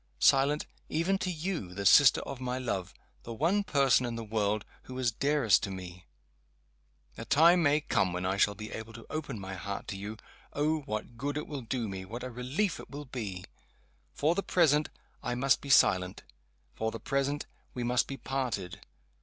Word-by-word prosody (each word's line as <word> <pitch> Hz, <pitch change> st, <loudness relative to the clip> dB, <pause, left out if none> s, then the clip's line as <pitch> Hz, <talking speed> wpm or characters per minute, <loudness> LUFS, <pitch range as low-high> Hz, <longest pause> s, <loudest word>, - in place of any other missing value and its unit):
Silent 140 Hz, +2 st, +4 dB, 0.2 s
even 175 Hz, +5 st, +1 dB
to 185 Hz, -, -2 dB
you, 160 Hz, -, -3 dB
the 100 Hz, -, -4 dB
sister 140 Hz, +8 st, +7 dB
of 135 Hz, -2 st, -7 dB
my 125 Hz, 0 st, -2 dB
love 105 Hz, -8 st, -3 dB, 0.3 s
the 115 Hz, -, -7 dB
one 175 Hz, -, +2 dB
person 140 Hz, -7 st, +3 dB
in 120 Hz, -1 st, -3 dB
the 115 Hz, -, -4 dB
world 105 Hz, -1 st, 0 dB, 0.2 s
who 130 Hz, -, -8 dB
is 125 Hz, -3 st, +1 dB
dearest 140 Hz, -2 st, +3 dB
to -, -, -3 dB
me! 90 Hz, -1 st, -8 dB, 1.1 s
A -, -, -5 dB
time 170 Hz, +4 st, +6 dB
may 150 Hz, -1 st, +3 dB
come 95 Hz, -10 st, +1 dB
when 90 Hz, +1 st, -3 dB
I 95 Hz, +1 st, +1 dB
shall 100 Hz, +1 st, +3 dB
be 110 Hz, +2 st, -8 dB
able 110 Hz, 0 st, -7 dB
to 115 Hz, 0 st, -11 dB
open 145 Hz, -7 st, -4 dB
my 95 Hz, 0 st, -6 dB
heart 100 Hz, +2 st, -5 dB
to 100 Hz, -, -3 dB
you. 105 Hz, +3 st, -6 dB, 0.4 s
Oh, 155 Hz, +2 st, +1 dB
what 110 Hz, +2 st, -4 dB
good 145 Hz, +4 st, -2 dB
it 150 Hz, -, -3 dB
will 145 Hz, -3 st, -5 dB
do 120 Hz, -1 st, -2 dB
me! 95 Hz, -1 st, -5 dB
what 115 Hz, +6 st, -7 dB
a 130 Hz, -, -5 dB
relief 130 Hz, -, -1 dB
it -, -, -10 dB
will 145 Hz, +1 st, -7 dB
be! 105 Hz, -8 st, -5 dB, 0.7 s
For 155 Hz, +3 st, +1 dB
the 200 Hz, -, -1 dB
present, 155 Hz, -6 st, +3 dB, 0.3 s
I 125 Hz, -, -2 dB
must 135 Hz, +1 st, +3 dB
be 140 Hz, -, -8 dB
silent. 90 Hz, -8 st, +4 dB, 0.5 s
For 110 Hz, -, -1 dB
the 115 Hz, -, -6 dB
present, 140 Hz, +2 st, -1 dB, 0.3 s
we 125 Hz, -, -2 dB
must 125 Hz, +1 st, +2 dB
be 135 Hz, -, -5 dB
parted. 125 Hz, -11 st, -3 dB
125 Hz, 195 wpm, -30 LUFS, 105-145 Hz, 1.1 s, sister